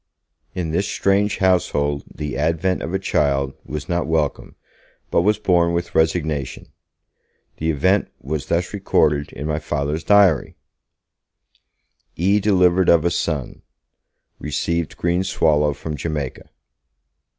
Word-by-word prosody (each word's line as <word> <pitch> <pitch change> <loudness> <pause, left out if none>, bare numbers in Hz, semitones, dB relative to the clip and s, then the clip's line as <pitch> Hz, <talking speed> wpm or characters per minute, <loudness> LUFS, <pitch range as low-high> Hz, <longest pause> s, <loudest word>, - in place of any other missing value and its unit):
In 85 -3 -2
this 95 +5 0
strange 100 +1 +1
household 75 -6 +1
the 75 -2 -5
advent 80 +5 0
of 85 - -4
a 95 - +1
child 70 -7 0
was 75 -1 -6
not 85 -3 -1
welcomed, 80 -3 -1 0.6
but - - +3
was 105 +4 +2
borne 85 -5 +2
with 85 0 -3
resignation. 80 -4 -1 0.9
The 80 - -2
event 95 +6 +2
was 75 +2 -4
thus 85 +3 -1
recorded 75 -7 +1
in 70 - -7
my 75 0 -1
Father's 75 0 -2
diary: 100 -8 +4 1.6
'E. 100 +5 +2
delivered 95 -3 +3
of 85 -1 +4
a 85 - +2
son. 75 -5 -3 0.8
Received 85 +2 -2
green 85 +2 0
swallow 75 -5 +2
from 75 +2 -6
Jamaica.' 75 -4 -5
80 Hz, 125 wpm, -21 LUFS, 75-90 Hz, 1.6 s, diary